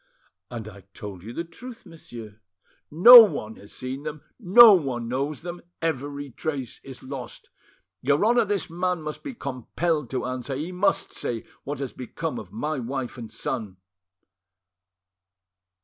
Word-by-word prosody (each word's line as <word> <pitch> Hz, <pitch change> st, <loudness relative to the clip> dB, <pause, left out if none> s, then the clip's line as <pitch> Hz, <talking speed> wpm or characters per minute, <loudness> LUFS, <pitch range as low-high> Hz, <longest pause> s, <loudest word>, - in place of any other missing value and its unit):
"And 115 Hz, -3 st, -7 dB
I 100 Hz, -2 st, -11 dB
told 100 Hz, -4 st, -8 dB
you 110 Hz, +5 st, -9 dB
the 165 Hz, -, -4 dB
truth, 230 Hz, +9 st, -12 dB
monsieur." 115 Hz, -, -11 dB, 0.5 s
"No 235 Hz, +11 st, +11 dB
one 125 Hz, -, -3 dB
has 100 Hz, -, -12 dB
seen 130 Hz, +2 st, -5 dB
them, 150 Hz, 0 st, -7 dB, 0.2 s
no 220 Hz, +2 st, +9 dB
one 130 Hz, -10 st, 0 dB
knows 140 Hz, +5 st, -3 dB
them; 175 Hz, 0 st, -7 dB, 0.2 s
every 145 Hz, -3 st, -3 dB
trace 135 Hz, -2 st, -5 dB
is 135 Hz, -2 st, -11 dB
lost. 130 Hz, -3 st, -8 dB, 0.5 s
Your 140 Hz, +8 st, +2 dB
Honour, 235 Hz, 0 st, +4 dB
this 205 Hz, -1 st, -1 dB
man 180 Hz, 0 st, -2 dB
must 155 Hz, 0 st, -6 dB
be 275 Hz, -4 st, -7 dB
compelled 145 Hz, -, -2 dB
to 130 Hz, -, -3 dB
answer, 130 Hz, +2 st, -4 dB
he 155 Hz, +6 st, -4 dB
must 185 Hz, +3 st, 0 dB
say 115 Hz, -2 st, -4 dB, 0.2 s
what 145 Hz, +1 st, -4 dB
has 135 Hz, -2 st, -5 dB
become 150 Hz, +5 st, -5 dB
of -, -, -11 dB
my 155 Hz, -1 st, -3 dB
wife 125 Hz, +1 st, -4 dB
and 115 Hz, -2 st, -8 dB
son!" 110 Hz, -7 st, -4 dB
140 Hz, 150 wpm, -25 LUFS, 125-170 Hz, 0.5 s, No